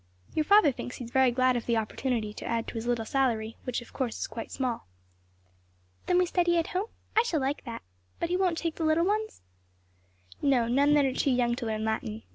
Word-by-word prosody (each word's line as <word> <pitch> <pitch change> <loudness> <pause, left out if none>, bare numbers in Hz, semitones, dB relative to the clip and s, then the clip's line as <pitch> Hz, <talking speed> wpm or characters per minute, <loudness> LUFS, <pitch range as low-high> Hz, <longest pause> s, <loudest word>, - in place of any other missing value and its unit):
"Your 310 - +1
father 405 -6 +6
thinks 245 0 -7
he 245 - -7
is 230 - -11
very 265 0 +5
glad 255 +1 +2
of 240 - -3
the 235 -1 +2
opportunity 220 0 -2
to - - -8
add 230 -1 0
a - - -8
little 240 +1 0
to 230 - -5
his - - -10
salary; 230 -5 0
which, 250 -1 -2
of - - -18
course, 250 -5 -2
is - - -2
quite 230 - -7
small." 250 - -3 1.2
"Then 360 - +3
we 360 - +4
study 345 -1 +2
at 330 - 0
home? 380 +4 -1 0.3
I 445 - +7
shall 405 -10 0
like 275 +2 -2
that. 235 -2 -6 0.4
But 340 - -1
he 355 - +1
won't 365 -3 +1
take 330 -1 -3
little 320 +1 +3
ones?" 430 +2 -1 1.0
"No; 255 -5 +3
none 280 +5 +4
that 290 -2 +4
are 265 - 0
too 280 - +1
young 245 -2 +2
to 235 -1 -3
learn 220 0 -2
Latin. 110 - -3
260 Hz, 230 wpm, -28 LUFS, 235-330 Hz, 1.2 s, I